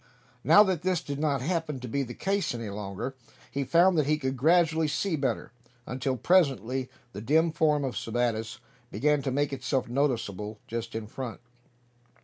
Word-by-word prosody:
Now 210 - +8
that 185 -6 -1
this 185 -1 +1
did 140 0 -5
not 140 -4 0
happen 160 -3 -2
to 125 - -7
be 140 +5 -1
the 125 -2 -5
case 195 -8 -1
any 115 -3 -5
longer, 100 +5 -5 0.4
he 140 - -1
found 170 +4 +4
that 145 - +1
he 155 +1 +3
could 130 -2 -2
gradually 160 +3 +3
see 170 +4 -1
better; 140 -3 -2 0.3
until 130 +1 -2
presently 130 - +2 0.2
the 100 - -6
dim 160 +8 +3
form 150 -2 +2
of 130 -2 -2
Sebattis 115 -1 -1 0.3
began 150 +2 +1
to 135 - -2
make 140 +2 0
itself 130 0 -1
noticeable 115 -6 -1
just 115 0 -5
in 110 -1 -3
front. 120 +1 -6
135 Hz, 170 wpm, -28 LUFS, 120-155 Hz, 0.4 s, Now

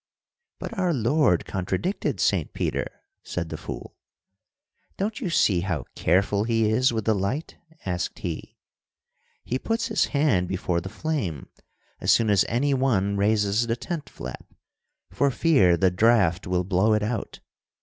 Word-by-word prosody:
"But 230 - -6
our 180 -3 +1
Lord 125 - +2
contradicted 95 - -2
Saint - - +1
Peter," - - -3 0.2
said - - -4
the - - -5
fool. - - -8 1.0
"'Don't 215 +2 -2
you 185 - -2
see 100 - +3
how 85 -4 -2
careful 100 +4 +2
he 115 -1 +1
is 120 +4 +3
with 110 -2 -2
the 110 - +3
light?' 105 +10 -3 0.3
asked 90 -1 -2
He. 90 -9 -6 0.9
'He 130 - -2
puts 225 - -1
his 220 - +2
hand 140 - +1
before 90 -2 -1
the 95 - -7
flame 105 - -3 0.5
as - - +2
soon 110 -2 +4
as 100 - +4
any 140 +5 +1
one 110 -7 +1
raises 105 +2 +2
the 115 - 0
tent 165 +3 -5
flap, 65 +1 -8 0.7
for 140 +10 +2
fear 120 - +3
the 95 +1 +3
draught 95 -3 +3
will 90 0 +1
blow 95 +4 +2
it 105 - 0
out. 110 0 -3
110 Hz, 150 wpm, -25 LUFS, 95-135 Hz, 1.0 s, soon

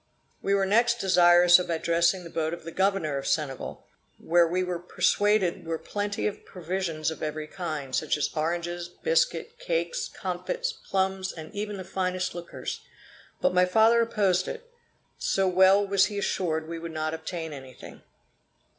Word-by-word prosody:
We 200 - +1
were 195 -1 +2
next 235 +4 +3
desirous 175 -3 +6
of 180 - -4
addressing 170 +2 +1
the 170 - -10
boat 160 +1 -1
of 170 - -15
the 165 - -7
Governor 190 -7 0
of 135 - -6
Senegal, 140 -4 -2 0.3
where 170 0 +3
we 180 +2 0
were 180 -1 -3
persuaded 190 +2 +1
were 165 0 -3
plenty 205 +4 -3
of 210 - -3
provisions 170 -3 -3
of 160 - -8
every 155 0 -3
kind, 155 -6 -5
such 155 -1 0
as 150 - +1
oranges, 170 +2 -2
biscuit, 485 - 0
cakes, - - -1
comfits, - - -3
plums 190 - -2
and 160 +2 -10
even 205 0 -4
the 190 - -6
finest 185 0 -2
liquors; 175 0 -6 0.6
but 275 - +2
my 180 0 +5
father 225 +5 +4
opposed 195 -5 +1
it, 485 +1 -7 0.5
so 195 -1 +1
well 190 +2 +5
was 200 0 +3
he 205 - -6
assured 160 -5 -1
we 165 0 -5
would 165 0 -6
not 155 0 -2
obtain 160 -1 -5
anything. 130 -3 -11
180 Hz, 165 wpm, -27 LUFS, 165-200 Hz, 0.6 s, desirous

